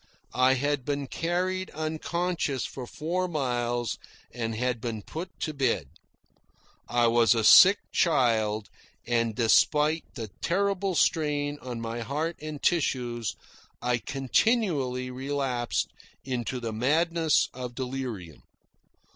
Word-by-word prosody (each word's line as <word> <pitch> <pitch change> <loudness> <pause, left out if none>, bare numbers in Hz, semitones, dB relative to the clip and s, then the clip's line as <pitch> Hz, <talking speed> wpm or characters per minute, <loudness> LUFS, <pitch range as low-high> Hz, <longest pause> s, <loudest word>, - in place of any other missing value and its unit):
I 130 +1 +4
had 145 +1 0
been 145 +1 -2
carried 180 +6 -2
unconscious 160 -2 -2
for 125 -2 -7
four 175 +7 -2
miles 120 - -1 0.3
and 115 -2 -3 0.3
been 110 -3 -4
put 170 - -6
to 155 - -2
bed. 125 - 0 1.0
I 120 0 +2
was 115 0 +4
a 115 - +1
sick 195 - +9
child, 110 - +1 0.3
and, 115 -2 0
despite 150 +6 +3
the 110 -2 -5
terrible 195 +1 0
strain 145 -2 +1
on 125 -2 -5
my 115 +1 -4
heart 150 +8 -2
and 155 -1 -6
tissues, 120 - 0 0.4
I 125 0 0
continually 135 - 0
relapsed 130 -2 -2 0.3
into 125 -1 -3
the 115 -2 -4
madness 160 +6 +2
of 125 -1 -6
delirium. 125 - -5
130 Hz, 115 wpm, -27 LUFS, 120-160 Hz, 1.0 s, sick